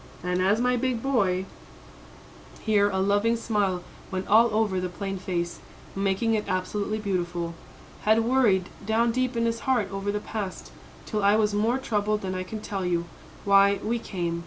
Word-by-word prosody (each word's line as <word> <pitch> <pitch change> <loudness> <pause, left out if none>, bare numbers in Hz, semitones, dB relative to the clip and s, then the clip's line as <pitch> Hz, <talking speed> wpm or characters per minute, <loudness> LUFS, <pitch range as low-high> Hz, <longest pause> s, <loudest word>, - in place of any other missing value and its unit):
And 180 0 0
as 200 +4 +3
my 250 0 +2
big 245 -2 -1
boy" 195 -9 +1 1.2
here 205 -2 +3
a 190 - -2
loving 205 +4 +2
smile 200 -6 0 0.3
went 185 0 -4
all 225 +2 +5
over 210 -3 +1
the 180 0 -2
plain 195 +1 -5
face, 175 -2 -3 0.4
making 195 +3 +1
it 215 -1 0
absolutely 200 +3 -1
beautiful 175 -4 -2 0.5
"had 220 +1 +3
worried 225 -8 +3
down 225 +3 +2
deep 255 0 -1
in 230 - +1
his 230 0 0
heart 255 -6 +2
over 195 +1 -2
the 210 - -2
past, 205 -3 -6 0.3
till 215 -2 -2
I 200 +1 +5
was 215 -1 +2
more 220 +5 +2
troubled 210 -4 -1
than 185 -1 -3
I 185 - -2
can 210 +4 -6
tell 195 -3 -4
you, 170 -1 0 0.4
why, 200 0 +5
we 230 +2 0
came. 175 -6 -3
205 Hz, 175 wpm, -26 LUFS, 185-225 Hz, 1.2 s, all